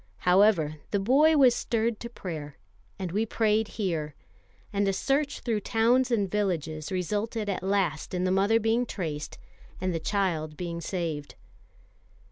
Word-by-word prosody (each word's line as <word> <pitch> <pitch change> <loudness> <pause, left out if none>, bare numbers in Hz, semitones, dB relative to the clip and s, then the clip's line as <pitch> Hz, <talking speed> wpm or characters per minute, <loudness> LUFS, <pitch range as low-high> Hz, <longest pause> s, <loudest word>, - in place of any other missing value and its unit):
However, 180 -5 +4
the 205 - 0
boy 290 +10 +4
was 260 -4 +6
stirred 230 -2 -1
to 235 - -6
prayer, 155 -10 -7 0.4
and 185 -3 -4
we 210 +5 +1
prayed 220 -1 +1
here; 160 -8 -2 0.6
and 200 0 +1
a 195 - +2
search 280 +7 0
through 225 -3 0
towns 235 +5 +2
and 215 -5 +1
villages 165 -7 -2
resulted 210 +4 -2
at 200 - -2
last 190 -3 -1
in 180 - 0
the 185 - +1
mother 200 +4 +3
being 230 +2 +1
traced 155 -8 -5 0.4
and 185 -1 -1
the 165 - -1
child 160 -6 -1
being 170 -1 -4
saved. 165 -5 -4
200 Hz, 150 wpm, -27 LUFS, 170-225 Hz, 0.6 s, was